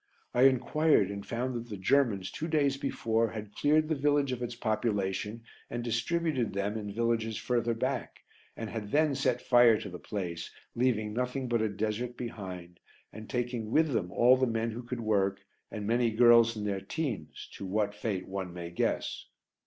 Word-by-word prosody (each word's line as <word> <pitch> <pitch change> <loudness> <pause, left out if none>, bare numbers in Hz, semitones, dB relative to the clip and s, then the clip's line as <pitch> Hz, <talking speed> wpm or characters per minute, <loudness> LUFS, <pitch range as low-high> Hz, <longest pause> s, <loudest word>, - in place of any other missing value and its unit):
I 125 +2 +5
enquired 130 -3 +3
and 100 0 -5
found 125 +4 -2
that 120 0 -5
the 105 - -5
Germans, 100 -2 +2
two 160 - -4
days 145 -4 +2
before, 115 -5 0
had 105 -1 -7
cleared 155 +1 +3
the 160 - +1
village 145 -1 +2
of 125 -1 -3
its 120 -1 -4
population 110 -1 -1 0.3
and 120 0 -3
distributed 130 +2 0
them 100 +2 -1
in 105 -2 -4
villages 115 0 0
further 120 -1 0
back, - - -3 0.3
and 115 - -4
had 105 -3 -5
then 150 0 +3
set 125 -2 0
fire 120 -3 +6
to - - -6
the 90 -1 -8
place, 85 -5 -4 0.2
leaving 115 -4 +1
nothing 125 +2 -2
but 120 -2 +1
a 110 - +1
desert 110 +4 -3
behind, 90 -7 -7 0.3
and 110 +1 -9
taking 120 -3 -2
with 160 +6 +3
them 90 -5 -1
all 120 +5 +6
the 130 0 +2
men 115 0 -1
who 115 +2 -6
could 120 0 -5
work 100 -3 +1 0.3
and 105 -1 -5
many 120 +2 +2
girls 115 0 +6
in 105 - -4
their 100 -2 -1
teens 110 - -4
to 95 - -7
what 105 +1 0
fate 105 -3 -3
one 95 -2 -4
may 85 -1 -7
guess. 85 - -2
115 Hz, 185 wpm, -30 LUFS, 105-125 Hz, 0.3 s, fire